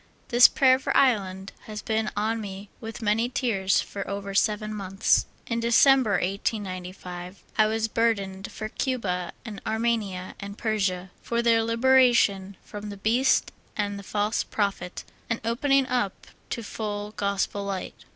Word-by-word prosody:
This 245 0 +8
pra^^er 260 -1 +4
for - - +1
Ireland 195 -7 +2 0.2
has 210 -1 -6
been 220 -1 0
on 220 +2 0
me 200 0 -7
with 225 0 -7
many 225 +3 +2
tears 210 -8 +1
for 200 - -6
over 200 0 -4
seven 215 +1 +1
months. 195 -2 +1 0.2
In 230 -1 -2
December, 235 0 +5
1895, 185 -2 -3 0.2
^ 215 - +7
^'^'^^ 220 0 -1
burdened 200 -4 0
for 215 - -5
Cuba 205 -8 -2
and 210 -4 -7
Armenia 220 -5 -1
and 200 +1 -7
Persia, 190 -5 -1
for 235 0 -1
their 230 -1 +4
liberation 230 -5 +3
from 210 0 -8
the 200 - -7
beast 235 +6 +2 0.3
and 205 -1 -1
the - - -7
false 210 +2 -1
prophet, 195 -4 -2 0.3
and 230 - 0
opening 270 +4 +2
up 245 -6 -2 0.2
to 235 - -4
full 205 -1 -4
Gospel 200 -1 -1
light. 195 -2 -4
210 Hz, 145 wpm, -26 LUFS, 195-230 Hz, 0.3 s, This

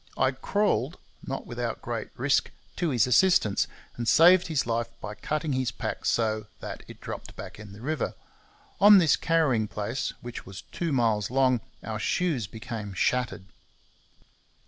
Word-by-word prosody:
I 130 0 +3
crawled, 200 +10 0 0.2
not - - -5
without - - -4
great - - -4
risk, - - +2 0.3
to 175 - 0
his 120 -6 +3
assistance, 125 - +4 0.3
and 120 -1 -4
saved 175 +8 +6
his 155 -5 0
life 115 0 -1
by 105 - -6
cutting 150 +7 -2
his 130 -1 0
pack - - -5
so 110 -2 +1
[that] - - -7
it - - -12
dropped - - -7
back - - -9
in 105 -1 -10
the 100 +2 -12
river. 155 +5 -2 0.6
On 205 0 +9
this 165 -7 +5
carrying 145 -10 +2
place, 105 +5 -3
which 120 -1 -7
was 95 0 -10
two 170 -2 -2
miles 115 -6 +1
long, 130 -2 +3 0.2
our 110 0 -4
shoes 145 - 0
became 110 -2 -6
shattered. 110 -4 0
125 Hz, 155 wpm, -27 LUFS, 110-155 Hz, 0.6 s, On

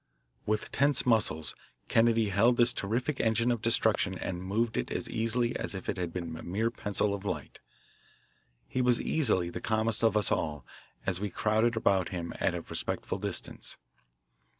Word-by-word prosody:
With 105 0 -1
tense 140 +1 +2
muscles 105 -10 +2 0.3
Kennedy 115 -1 +3
held 115 +5 +3
this 120 0 +5
terrific 125 +8 -2
engine 115 +2 +2
of 120 -3 -1
destruction 110 -5 +2
and 90 -1 -4
moved 110 +5 0
it - - -1
as - - -2
easily 115 +2 0
as - - -3
if 95 - -7
it - - -1
had 90 -2 -2
been 85 -2 -5
a 80 - -8
mere 110 +6 -1
pencil 105 -2 0
of 100 -1 -5
light. 100 - -4 1.1
He 130 - -1
was 125 -1 +3
easily 100 - +1
the - - -6
calmest 110 0 +1
of 110 -2 +4
us 105 - +2
all 75 -5 -1 0.4
as 95 -1 -1
we 105 0 -2
crowded 110 +4 +1
about 95 -5 +2
him 85 -2 -4
at 90 - +1
a 85 - -3
respectful - - -3
distance. - - -5
110 Hz, 175 wpm, -30 LUFS, 95-115 Hz, 1.1 s, this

